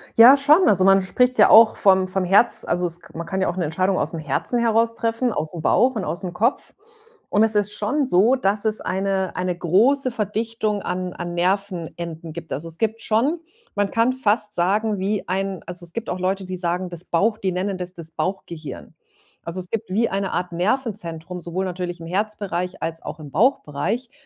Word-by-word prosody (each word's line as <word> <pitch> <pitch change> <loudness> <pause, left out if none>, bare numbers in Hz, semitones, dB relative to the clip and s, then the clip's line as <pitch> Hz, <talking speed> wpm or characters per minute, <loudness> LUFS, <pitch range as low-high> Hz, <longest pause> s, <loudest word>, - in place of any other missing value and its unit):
Ja, 250 +5 +9
schon. 300 +6 +5
Also, 190 -3 +4
man 195 0 +6
spricht 250 +7 +1
ja - - +7
auch 225 0 +8
vom 190 -1 +4
vom 185 0 -1
Herz, 200 +6 +3
also, 175 +1 0
es 170 0 -4
k 170 - -14
man 170 - -4
kann 190 +2 -3
ja - - +1
auch - - -4
'ne 175 - 0
Entscheidung 185 +5 0
ausm 160 +2 -2
Herzen 155 - -1
heraus 230 0 +2
treffen, 230 +1 -1
aus 155 -3 -4
'm 165 - -5
Bauch 255 +8 +3
und 210 - -2
aus 175 - -4
'm 180 - -4
Kopf. 230 +8 -1 0.5
Und 210 +2 +3
es 220 -1 +1
ist 205 0 +1
schon 260 +8 0
so, 230 +4 +4
dass 205 -4 +1
es 215 -1 +2
eine 190 0 -2
eine 180 -1 -2
große 240 - +2
Verdichtung 215 -1 -2
an 180 0 -3
an 175 0 -6
Nervenenden 175 -3 -2
gibt. 170 0 -7
Also, 160 +4 -4
es 165 - -4
gibt 225 +2 -1
schon 260 +10 +1 0.4
man 205 -1 0
kann 230 +4 +2
fast 210 -4 0
sagen, 205 +3 +1
wie 200 +2 -2
ein 195 0 -2
also, 175 0 -6
es 170 0 -9
gibt 230 - -4
auch 180 - -4
Leute, 190 +1 -1
die 185 0 -5
sagen, 180 +1 -1
das 175 0 -7
Bauch 210 +6 +1
die 190 - -1
nennen 185 +1 -2
das: 180 +1 -5
„das 165 -1 -7
Bauchgehirn.“ 170 -5 -5 0.5
Also, 170 +2 -4
es 180 - -4
gibt 225 -2 -3
wie 220 +5 +1
eine 195 -1 -2
Art 180 0 -2
Nervenzentrum, 180 -4 -2
sowohl 175 +2 -3
natürlich 180 -1 -5
im 165 - -9
Herzbereich 190 -1 -3
als 165 0 -4
auch 155 - -8
im 145 -3 -10
Bauchbereich. 225 - 0
190 Hz, 210 wpm, -22 LUFS, 175-220 Hz, 0.5 s, Ja